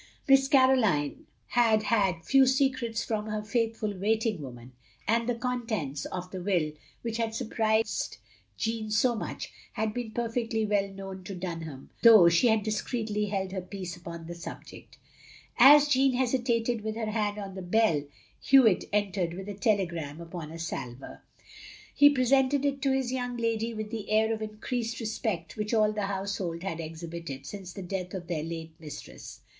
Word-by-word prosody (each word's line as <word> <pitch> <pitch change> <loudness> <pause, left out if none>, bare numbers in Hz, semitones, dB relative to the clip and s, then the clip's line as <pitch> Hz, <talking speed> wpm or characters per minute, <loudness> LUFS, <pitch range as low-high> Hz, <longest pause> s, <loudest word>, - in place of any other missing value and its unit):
Miss 270 0 +6
Caroline 260 - +3 0.2
had 225 -3 +3
had 190 -8 +1
few 270 -1 +5
secrets 260 -3 +1
from 215 -1 -2
her 215 0 -3
faithftil 220 -2 -1
waiting 215 -1 0
woman, 125 -2 -9 0.4
and 230 +2 +2
the 245 - +1
contents 230 - -3
of 180 0 -6
the 185 - -5
will, 175 -5 +1 0.3
which 230 -1 -2
had 225 -1 -1
stirprised 220 - 0 0.4
Jeanne 225 -1 -2
so 230 +3 +3
much, 220 - -5 0.2
had 220 -1 -1
been 245 -1 -4
perfectly 230 -1 -1
well 205 -1 +1
known 195 -1 -8
to 195 - -6
Dunham, 165 -6 -6
though 220 -7 +9
she 170 +9 +4
had 220 -2 +3
discreetly 215 -1 -2
held 190 -2 -2
her 190 -1 -3
peace 185 -1 -6
upon 170 -1 -8
the 170 - -6
subject. 170 - -10 0.6
As 290 +4 +9
Jeanne 270 -2 +3
hesitated, 240 -2 0
with 215 0 -3
her 220 -1 -2
hand 210 -1 -1
on 200 -2 -6
the 190 - -6
bell, 180 -5 +2 0.4
Hewitt 250 -8 +5
entered 195 -4 0
with 190 +1 -7
a 205 - -4
telegram 175 -8 -1
upon 170 -2 -7
a 165 - -7
salver. 130 -6 -6 0.7
He 290 - +7
presented 270 +1 +3
it 275 -1 0
to 275 -1 +2
his 265 -2 0
young 245 -1 -3
lady 230 0 0
with 215 0 -5
the 220 -3 -5
air 220 +1 +3
of 220 - -5
increased 230 +2 -3
respect 215 -6 -3
which 210 +1 -1
all 215 -1 +4
the 210 -2 -2
household 190 -3 -3
had 170 -4 -3
exhibited, 165 -3 -7
since 190 0 -7
the 195 - -7
death 180 0 -4
of 180 -2 -5
their 170 -3 -2
late 165 0 -6
mistress. 155 -2 -10
215 Hz, 170 wpm, -28 LUFS, 180-235 Hz, 0.7 s, though